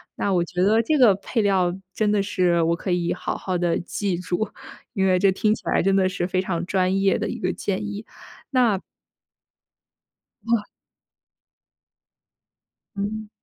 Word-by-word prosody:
那 200 - -1
我 180 - +3
觉 180 +1 -1
得 215 +4 +4
这 300 +7 +1
个 245 -7 +7
配 210 +4 -2
料 185 -3 +2 0.2
真 215 -1 +1
的 205 -1 +2
是 180 -4 +1
我 165 +1 +2
可 185 - -5
以 175 -1 +1
好 - - -4
好 185 -2 -2
地 175 -1 +1
记 190 +1 -2
住， 180 +4 -2 0.4
因 195 -4 +1
为 185 -1 +3
这 195 +1 +4
听 210 +2 +2
起 - - -7
来 - - +2
真 195 +1 +2
的 190 -1 +3
是 180 -1 -2
非 185 0 0
常 175 -2 -2
专 190 +1 +1
业 195 -1 +2
的 - - -1
一 - - -5
个 185 - 0
建 200 +1 -3
议。 210 +1 -6 0.6
那 220 -6 +3 1.7
哇。 230 -2 +2 2.3
嗯。 210 +2 -4
195 Hz, 180 characters per minute, -23 LUFS, 180-205 Hz, 2.3 s, 个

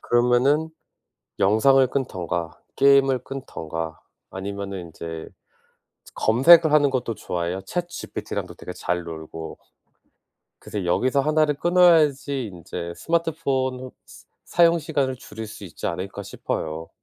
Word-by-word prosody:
그러면은 125 +6 +2 0.7
영상을 130 +7 +5
끊든가 90 - -3 0.2
게임을 135 -1 +5
끊든가 80 - -6 0.3
아니면은 100 0 -5
인제 80 0 -7 0.8
즈 - - -16
검색을 155 +8 +6
하는 145 -2 +5
것도 130 -3 -2
좋아해요. 90 -2 -3
Chat 175 -1 -2
GPT랑도 - - -6
되게 90 - -8
잘 90 0 -2
놀고. 80 0 -8 1.0
그래서 100 -3 -5
여기서 130 +10 +2
1 155 +2 +3
를 150 - 0
끊어야지 150 -6 +3
인제 85 -2 -7
스마트폰 135 -6 -1 0.2
스 - - -16 0.2
사용 170 0 +4
시간을 145 -5 -1
줄일 110 -2 -8
수 105 - -11
있지 85 - -6
않을까 95 +4 -4
싶어요. 80 -3 -4
125 Hz, 290 characters per minute, -24 LUFS, 90-140 Hz, 1.0 s, 검색을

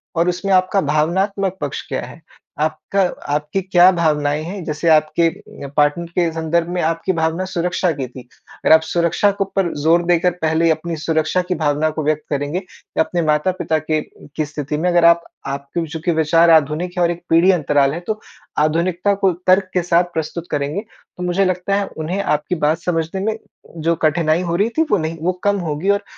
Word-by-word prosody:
और 170 +2 +2
उसमें 180 +2 -1
आपका 185 +1 +3
भावनात्मक 190 +6 0
पक्ष 145 -2 -4
क्या - - -3
है। - - -13 0.4
आपका 155 +5 -1 0.3
आपकी 150 +6 -1
क्या 185 0 +5
भावनाएँ 150 -2 +1
हैं। 185 +3 -6
जैसे 150 +2 -3
आपके 160 +2 +3 0.5
पार्टनर 150 +3 +2
के 170 -2 +2
संदर्भ 165 +1 0
में 175 0 -1
आपकी 165 +3 0
भावना 160 +3 0
सुरक्षा 180 -1 -1
की 140 -4 -4
थी। 125 +1 -11 0.3
अगर - - +3
आप 160 - +7
सुरक्षा 170 +5 +1
के 195 0 -1
ऊपर 195 -3 -1
जोर 170 +2 +4
देकर 175 +1 +3
पहले 160 +1 +2
अपनी 165 +1 -2
सुरक्षा 160 +3 +1
की 180 - +1
भावना 150 0 +1
को 155 0 -4
व्यक्त 155 +1 0
करेंगे 145 +3 -2
या 185 -3 -4
अपने 175 +1 -2
माता-पिता 155 +2 +1
के 155 0 -1 0.3
की 155 - -1
स्थिति 150 0 -4
में 175 +4 +1
अगर 175 -1 +4
आप 170 0 +5 0.2
आपके 140 +4 -3
चूँकि 165 +2 -2
विचार 165 +1 +3
आधुनिक 160 +3 +2
है 175 - +3
और 170 - +2
एक 175 0 -7
पीढ़ी 170 +3 +5
अंतराल 145 -5 +2
है 165 - -4
तो 215 -1 -2 0.4
आधुनिकता 170 +5 +1
को 190 - +5 0.2
तर्क 185 +1 +4
के 180 - +2
साथ 175 0 +3
प्रस्तुत 165 +2 -4
करेंगे 145 +6 -1 0.4
तो 180 - -5
मुझे 180 +2 +1
लगता 185 +2 0
है 200 0 0
उन्हें 170 +5 -2
आपकी 150 +1 -1
बात 155 +2 +2
समझने 170 +1 -2
में 220 0 -1 0.5
जो 170 - +3
कठिनाई 155 +1 +2
हो - - 0
रही 205 +5 +2
थी 320 - +5
वो 205 - +4
नहीं 160 -1 -3
वो 175 +3 +1
कम 205 0 +2
होगी 150 +6 -2
और 200 0 +2
170 Hz, 195 wpm, -19 LUFS, 155-180 Hz, 0.5 s, आप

